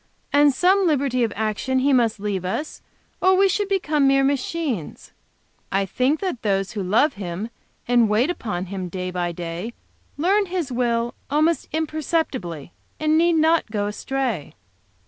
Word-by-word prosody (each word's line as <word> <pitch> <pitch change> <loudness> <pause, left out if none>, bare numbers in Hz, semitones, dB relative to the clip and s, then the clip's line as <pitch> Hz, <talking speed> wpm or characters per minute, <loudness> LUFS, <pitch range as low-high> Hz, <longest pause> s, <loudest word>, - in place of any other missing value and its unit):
"And 290 0 +6
some 370 +7 +3
liberty 275 -5 +1
of 225 - 0
action 220 +5 -1
He 275 +2 +3
must 230 -4 +2
leave 200 -3 -2
us, 190 +12 -4 0.4
or 375 0 +5
we 390 +1 +5
should 400 +1 0
become 310 -7 +2
mere 275 0 +4
machines. 275 - -2 0.6
I 195 +1 +1
think 255 - 0
that 365 -11 -3
those 195 -2 0
who 210 - -4
love 225 +11 +3
Him, 195 +3 -5 0.4
and 240 -2 +4
wait 235 +10 +2
upon 210 - -4
Him 185 -1 -5
day 185 +1 -4
by 175 -1 -2
day, 175 +6 -6 0.4
learn 390 +6 +2
His 350 -7 -3
will 240 -1 0 0.2
almost 310 +3 +1
imperceptibly, 310 - -2 0.3
and 310 0 +2
need 340 +2 +4
not 320 -3 +3
go 205 -2 -1
astray." 225 - -3
255 Hz, 155 wpm, -23 LUFS, 200-315 Hz, 0.6 s, And